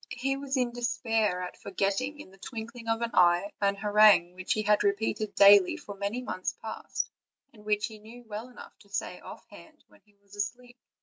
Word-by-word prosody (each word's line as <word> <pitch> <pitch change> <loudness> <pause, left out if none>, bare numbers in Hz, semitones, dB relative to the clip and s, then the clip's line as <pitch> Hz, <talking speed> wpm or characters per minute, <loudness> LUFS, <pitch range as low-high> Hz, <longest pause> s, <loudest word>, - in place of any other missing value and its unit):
He 270 +3 -2
was 275 0 -3
in 250 -2 +1
despair 225 -5 0
at 180 - -7
forget 195 0 -1
ting 285 +5 -3
in 240 - -11
the 195 - -19
twinkling 230 +2 -8
of 225 +1 0
an 230 - -2
eye 175 +2 +4
an 200 0 +2
harangue 205 -3 +5
which 185 +3 -2
he 215 -2 -1
had 210 0 +3
repeated 205 +1 -1
daily 200 -2 +7
for 205 - -9
many 200 +5 -3
months 185 -6 -3
past, 220 - -5 0.4
and 210 -2 -17
which 210 0 0
he 220 -2 -9
knew 230 +3 -13
well 220 +2 -7
enough 250 - -13
to 200 - -21
say 200 - -4
offhand - - -13
when - - -23
he 210 -1 -30
was 200 0 -18
asleep. 245 +4 -5
210 Hz, 200 wpm, -28 LUFS, 200-235 Hz, 0.4 s, daily